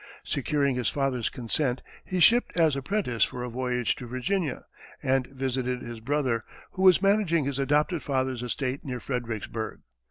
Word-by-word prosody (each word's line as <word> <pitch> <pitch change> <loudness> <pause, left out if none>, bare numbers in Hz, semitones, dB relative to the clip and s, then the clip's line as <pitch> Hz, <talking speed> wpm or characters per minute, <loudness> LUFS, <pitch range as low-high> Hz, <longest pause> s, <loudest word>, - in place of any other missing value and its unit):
Securing 140 -1 0
his 125 -3 +1
father's 135 -4 0
consent, 125 +2 -1 0.2
he 185 - -2
shipped 230 +5 +5
as 160 -4 +4
apprentice 135 - 0
for 125 - -2
a 125 - -3
voyage 125 0 0
to 125 - -8
Virginia, 130 +5 -2 0.4
and 130 -1 +2
visited 130 -2 -2
his 120 -1 -7
brother, 130 -2 0 0.3
who 185 - -5
was 190 0 +6
managing 195 -7 +3
his 140 -1 -2
adopted 150 +4 +2
father's 130 -3 -1
estate 130 +2 -2
near 125 -3 -4
Fredericksburg. 115 -3 -4
130 Hz, 155 wpm, -27 LUFS, 125-150 Hz, 0.4 s, was